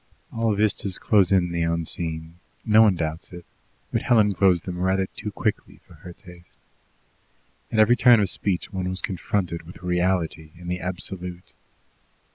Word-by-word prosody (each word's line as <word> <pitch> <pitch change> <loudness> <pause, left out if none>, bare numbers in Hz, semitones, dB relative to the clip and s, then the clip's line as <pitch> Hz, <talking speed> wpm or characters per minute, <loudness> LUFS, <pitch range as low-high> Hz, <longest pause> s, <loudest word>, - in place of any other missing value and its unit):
All 115 -2 0
vistas 100 -2 +1
close 100 -4 +3
in 90 -3 +2
the 85 0 -2
unseen 85 0 -2 0.3
no 110 0 +6
one 105 -4 +5
doubts 80 -1 -4
it 90 -1 -10 0.5
but - - +1
Helen 105 -4 +3
closed 90 -3 +2
them 90 -1 -5
rather 95 +1 +1
too 105 - -7
quickly 105 +1 -3
for - - -18
her 90 - -12
taste. 90 -1 -16 1.1
At - - -2
every 110 +3 +5
turn 120 -2 +6
of 100 - +2
speech 95 +1 -3
one 90 -1 -2
was 95 +1 -4
confronted 90 -2 -2
with 85 +3 -14
reality 90 -3 -1
and 90 0 -7
the 90 - -2
absolute. 90 0 -6
90 Hz, 160 wpm, -24 LUFS, 85-100 Hz, 1.1 s, no